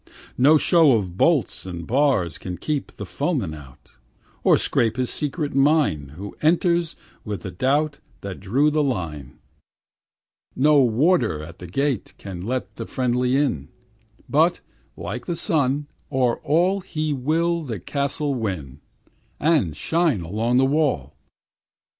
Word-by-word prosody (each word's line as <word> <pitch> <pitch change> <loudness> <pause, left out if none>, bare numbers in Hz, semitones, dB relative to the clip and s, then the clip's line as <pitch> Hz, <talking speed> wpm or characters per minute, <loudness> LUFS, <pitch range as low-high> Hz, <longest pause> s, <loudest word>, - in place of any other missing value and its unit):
No 145 +5 +6
show 160 -3 +5
of 95 -6 -1
bolts 155 - +2
and 85 -2 -6
bars 125 - +1
Can 90 -1 -6
keep 150 -3 -3
the - - -7
foeman 80 - -2
out, 70 -4 -14 0.5
Or - - +5
'scape 115 0 0
his 125 -1 0
secret 150 0 -2
mine, 135 - +2
Who 100 +2 -7
entered 170 +1 +2 0.3
with 105 -5 -5
the 95 - -6
doubt 140 - 0 0.2
That 100 -2 -6
drew 130 +11 +2
the 155 0 +2
line. 80 - -3 1.2
No 145 +1 +5
warder 120 - +2
at 85 +2 -11
the 90 - -8
gate 135 - -2
Can 95 -3 -8
let 125 +6 -4
the - - -5
friendly 125 0 +1
in; 85 - -1 0.6
But, 165 +4 +3 0.4
like - - -6
the 175 - -1
sun, 145 -4 +1 0.3
o'er 125 -3 +1
all 175 +6 +1
He 155 -3 -2
will 165 +6 0
the 120 -10 -5
castle 140 - -2
win, 85 - -4 0.6
And 145 - +2
shine 165 - +1
along 110 +8 0
the 135 - +5
wall. 135 - 0
130 Hz, 140 wpm, -23 LUFS, 95-150 Hz, 1.2 s, No